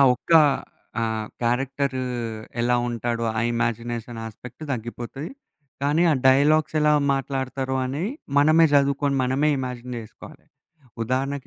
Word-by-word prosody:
ఒక్క 145 - -5 0.7
ఆహ్, 110 -1 -1 0.2
క్యారెక్టరు 135 +2 0 0.6
ఎలా 125 +1 +2
ఉంటాడో 115 0 -2
ఆ - - +2
ఇమాజినేషన్ 115 0 -2
యాస్పెక్ట్ 115 +6 -10
తగ్గిపోతది. 120 +4 -5 0.5
కానీ 145 +4 +2
ఆ - - +3
డైలాగ్స్ 145 +4 +4
ఎలా 150 0 +4 0.2
మాట్లాడతారు 135 -1 -2
అనేయి 145 - -2 0.3
మనమే 155 +3 +6
చదువుకోని, 140 0 +2
మనమే 135 +4 +1
ఇమాజిన్ 125 -1 -5
చేసుకోవాలి. 110 -2 -12 0.6
ఉదాహరణకి 130 +3 -2
130 Hz, 110 wpm, -24 LUFS, 120-140 Hz, 0.7 s, మనమే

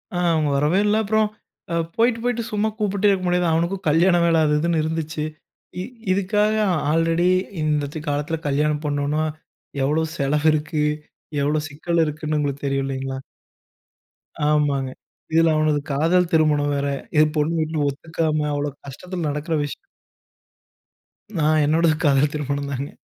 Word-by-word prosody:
ஆ, - - 0 0.2
அவுங்க 155 -2 +1
வரவே 155 +7 +2
இல்ல, 210 +1 +3
அப்புறம், 215 +1 +2 0.4
அ - - 0 0.2
போயிட்டு, 230 0 +2
போய்ட்டு 240 -1 0
சும்மா 210 +1 +1
கூப்பிட்டே 205 0 +1
இருக்க 185 -2 -1
முடியாது. 180 0 +2
அவனுக்கும் 170 +3 -1
கல்யாண 175 +4 +4
வேல 165 -1 +3
அது 150 - +2
இதுன்னு 165 -1 +1
இருந்துச்சு. 160 -1 -3 0.6
இ - - -3 0.3
இதுக்காக, 210 +3 +2 0.4
ஆல்ரெடி 165 +2 +2 0.3
இந்தத்த 150 0 -1
காலத்தில 145 +3 -1
கல்யாணம் 150 +2 0
பண்ணணுன்னா, 145 +1 0 0.6
எவ்ளோ 150 +4 +1
செலவு 145 +2 +1
இருக்கு 155 0 -1 0.6
எவ்ளோ 150 +2 +1
சிக்கல் 165 +3 -1
இருக்குன்னு 155 0 -3
உங்களுக்கு 145 -1 -2
தெரியும் 135 0 0
இல்லேங்களா! 135 0 -4 1.3
ஆமாங்க. 145 -3 +1 0.4
இதில 165 0 +5
அவனது 155 -1 +2
காதல் 165 +5 +2
திருமணம் 150 -2 +3
வேற. 140 0 -1 0.3
ஏ 155 - +7
பொண்ணு 155 +2 +1
வீட்ல 155 0 -1
ஒத்துக்காம 155 +1 -1
அவ்ளோ 145 0 -1 0.2
கஷ்டத்தில 175 +4 -5
நடக்கிற 150 +3 -3
விஷயம். 145 - -4 1.6
நான், 155 0 +3
என்னோடது 160 +1 +3
காதல் 145 0 +3
திருமணம் 140 -1 -3
தாங்க. 140 +2 -3
155 Hz, 140 wpm, -22 LUFS, 145-170 Hz, 1.6 s, ஏ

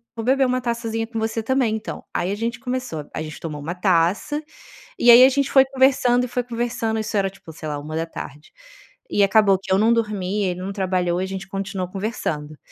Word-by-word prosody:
vou 225 - -4
beber 265 +1 +3
uma 255 0 0
taçazinha 230 -1 -2
com 225 -1 -4
você 225 0 -2
também 250 -3 +1
então.". 220 - -6
Aí 185 - -1
a - - -1
gente 235 +1 -2
começou. 250 - -4
A - - -3
gente 155 -1 -8
tomou 155 -3 -5
uma 165 +4 -4
taça, 185 - +1 0.6
e 240 - +6
aí 250 +2 +10
a - - +8
gente 280 0 0
foi 265 -1 +6
conversando 260 -2 +3
e - - -4
foi 245 +1 -1
conversando, 235 -1 -2
isso 215 0 -3
era 195 -1 +1
tipo, 190 -4 -14
sei 155 0 -8
lá, 145 - -3
13h. 155 -1 -6 0.6
E 205 - +2
acabou 200 -1 +4
que 195 0 -5
eu 190 - +4
não 225 +3 +4
dormi, 210 -3 -1
ele 180 -1 -2
não 195 - -4
trabalhou 185 -3 0
e 185 - -1
a - - -5
gente 190 0 -6
continuou 195 -1 -4
conversando 160 -7 -4
210 Hz, 215 wpm, -22 LUFS, 180-240 Hz, 0.6 s, aí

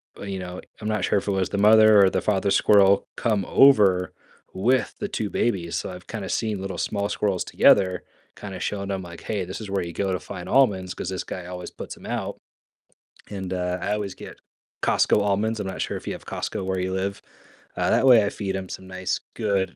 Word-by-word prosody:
b 100 -1 -7
you 95 - -4
know, 90 0 -7 0.2
I'm 105 - -4
not 105 -3 -1
sure 100 - +2
if 100 - -11
it - - +1
was 95 -1 0
the 100 - -3
mother 110 0 +7
or 95 - +6
the - - -1
father 100 -1 +1
squirrel 100 -1 +4
come 105 -5 0
over 100 -9 +5 0.4
with 125 +7 +1
the 205 - -2
2 110 - -3
babies. 90 -8 -1
So - - -4
I've 90 0 -11
kinda 105 -4 -5
seen 110 -4 -1
little 95 -2 -5
small 100 -1 -1
squirrels 100 -4 -1
together 90 -1 +4 0.3
kind 100 -2 -8
of 90 - -7
showing 100 -1 -3
them, 95 -1 -3
like, 85 -1 -10
"Hey, 100 -4 -3
this 95 +5 -7
is 105 - -7
where 100 -2 -1
you 85 - -7
go 95 -1 -1
to 90 - -1
find 90 - -8
almonds 95 -9 +2
'cause - - -6
this 95 - -3
guy 90 - -7
always 90 0 -7
puts - - -8
'em - - -14
out." - - -3 0.9
And, 95 -2 -5
uh, 90 0 -1
I 105 - -1
always 105 -3 -3
get - - -11 0.4
Costco - - +3
almonds, 105 +2 0
I'm 95 - -4
not 95 - -5
sure - - -2
if - - -11
you - - -2
have - - -10
Costco 95 - -4
where 95 0 -1
you 90 +1 -2
live, 100 +1 -3 0.6
uh, - - +1
that - - +3
way 120 -5 +7
I - - 0
feed 100 -3 -4
'em 95 -1 -6
some 95 - -8
nice 95 -1 -2 0.2
good 100 -4 -1
100 Hz, 230 wpm, -24 LUFS, 95-105 Hz, 0.9 s, mother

